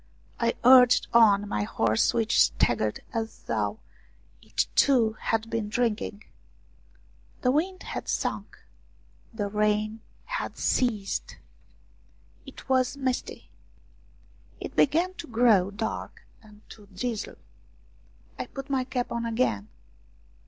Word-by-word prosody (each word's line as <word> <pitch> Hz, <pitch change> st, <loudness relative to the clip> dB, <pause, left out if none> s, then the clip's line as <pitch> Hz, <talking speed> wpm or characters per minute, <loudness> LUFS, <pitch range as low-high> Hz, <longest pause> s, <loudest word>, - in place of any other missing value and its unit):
I 235 Hz, 0 st, +1 dB
urged 250 Hz, 0 st, +7 dB
on 205 Hz, -3 st, +5 dB
my 105 Hz, -, -2 dB
horse 110 Hz, +1 st, +1 dB
which 225 Hz, -2 st, +1 dB
staggered 110 Hz, -2 st, +1 dB
as 225 Hz, -1 st, -4 dB
though -, -, -2 dB, 0.6 s
it, -, -, -1 dB
too, 240 Hz, -6 st, +4 dB
had 225 Hz, 0 st, -1 dB
been 225 Hz, -2 st, -3 dB
drinking. 215 Hz, -2 st, -2 dB, 1.2 s
The 250 Hz, -, +4 dB
wind 370 Hz, +7 st, -1 dB
had -, -, -6 dB
sunk, -, -, -3 dB, 0.7 s
the 215 Hz, -3 st, -3 dB
rain 210 Hz, +1 st, 0 dB, 0.2 s
had -, -, -4 dB
ceased. 220 Hz, -6 st, -1 dB, 1.1 s
It -, -, -11 dB
44 265 Hz, -, -1 dB
ROUMANIAN 255 Hz, -, +4 dB
STORIES 255 Hz, -, -7 dB
was 270 Hz, -, -6 dB
misty; 255 Hz, -1 st, -3 dB, 1.1 s
it -, -, -7 dB
began 335 Hz, +6 st, +2 dB
to 340 Hz, -3 st, -9 dB
grow 225 Hz, -5 st, +3 dB
dark 205 Hz, +2 st, -5 dB, 0.2 s
and 210 Hz, -1 st, -19 dB
to 210 Hz, -2 st, -14 dB
drizzle. 210 Hz, +3 st, -4 dB, 1.0 s
I -, -, -4 dB
put 275 Hz, 0 st, -8 dB
my 265 Hz, -2 st, +1 dB
cap 250 Hz, -1 st, -3 dB
on 235 Hz, 0 st, -2 dB
again. 225 Hz, -, -1 dB
225 Hz, 125 wpm, -27 LUFS, 210-255 Hz, 1.2 s, urged